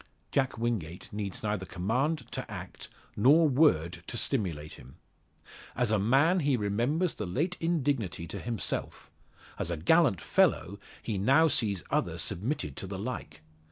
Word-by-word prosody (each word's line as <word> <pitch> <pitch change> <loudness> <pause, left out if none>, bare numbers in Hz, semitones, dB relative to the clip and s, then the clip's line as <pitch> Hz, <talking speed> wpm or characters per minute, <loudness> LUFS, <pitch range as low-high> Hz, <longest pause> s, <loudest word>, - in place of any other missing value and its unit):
Jack 135 -3 +1
Wingate 105 -9 -3
needs 105 -2 -4
neither 105 -3 -1
command 125 - -1
to - - -5
act - - -8 0.3
nor 150 +9 +5
word 110 - +3
to 120 - -4
stimulate 85 - -1
him. 65 - -14 0.8
As 120 -3 +1
a 110 - +3
man 140 - +4
he 140 -5 +2
remembers 120 - 0
the - - -5
late 155 - -1
indignity 140 - -1
to 85 - -6
himself; 115 -5 -4 0.5
as - - -1
a 85 - -2
gallant 120 - +4
fellow 100 +3 +1 0.2
he 105 -4 -2
now 135 +11 +5
sees 100 - 0
others - - 0
submitted 95 - -3
to - - -5
the - - -5
like. - - -6
115 Hz, 150 wpm, -29 LUFS, 95-145 Hz, 0.8 s, nor